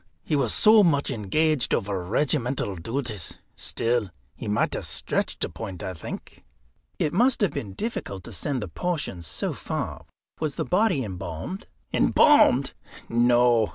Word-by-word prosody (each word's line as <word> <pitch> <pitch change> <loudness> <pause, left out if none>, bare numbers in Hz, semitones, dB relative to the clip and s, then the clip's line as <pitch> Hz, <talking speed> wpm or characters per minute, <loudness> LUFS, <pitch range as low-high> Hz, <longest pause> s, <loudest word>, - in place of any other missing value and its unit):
He 155 - 0
was 140 - +2
so 215 0 +6
much 145 -6 +2
engaged 135 +6 +1
over 95 -2 -2
regimental 125 - 0
duties. 110 - -4 0.2
Still, 115 -3 0 0.3
he - - -7
might 105 +1 +1
have - - -3
stretched - - -1
a - - -1
point, 95 -6 -7
I 95 - -3
think." 80 - -8 0.5
"It 150 - 0
must 245 +7 +3
have 200 - +3
been 100 -4 -5
difficult 100 - -4
to 115 - -10
send 125 - -2
the - - -4
portions 95 - -3
so - - -2
far. - - -5 0.3
Was 155 -3 -2
the - - -2
body 180 -7 +2
embalmed?" 95 - -6 0.3
"Embalmed! 140 - +5 0.4
no. 120 -1 +4
120 Hz, 150 wpm, -25 LUFS, 100-155 Hz, 0.5 s, so